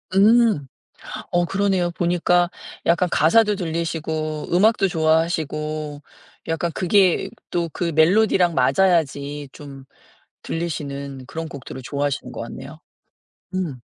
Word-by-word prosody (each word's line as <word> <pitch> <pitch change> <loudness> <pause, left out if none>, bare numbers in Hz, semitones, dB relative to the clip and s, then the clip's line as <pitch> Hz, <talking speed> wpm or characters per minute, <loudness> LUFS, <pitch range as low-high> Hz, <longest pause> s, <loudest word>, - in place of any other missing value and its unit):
음. 215 - +4 0.6
어. 175 0 +2
그러네요. 190 -2 0
보니까 175 0 +2 0.4
약간 170 +2 +3
가사도 210 +8 +4
들리시고 160 -3 -3
음악도 205 +1 +4
좋아하시고 155 -3 -1 0.5
약간 165 +1 -1
그게 185 -1 +2 0.2
또 170 -1 -1
그 170 -1 -2
멜로디랑 180 +1 +4
맞아야지 145 -2 +1
좀 140 -2 -11 0.6
들리시는 140 -5 -5
그런 165 +3 -5
곡들을 135 -3 -9
좋아하시는 140 -2 -2
것 - - -6
같네요. 135 +6 -9 0.8
음. 165 -9 -3
165 Hz, 260 characters per minute, -22 LUFS, 145-180 Hz, 0.8 s, 음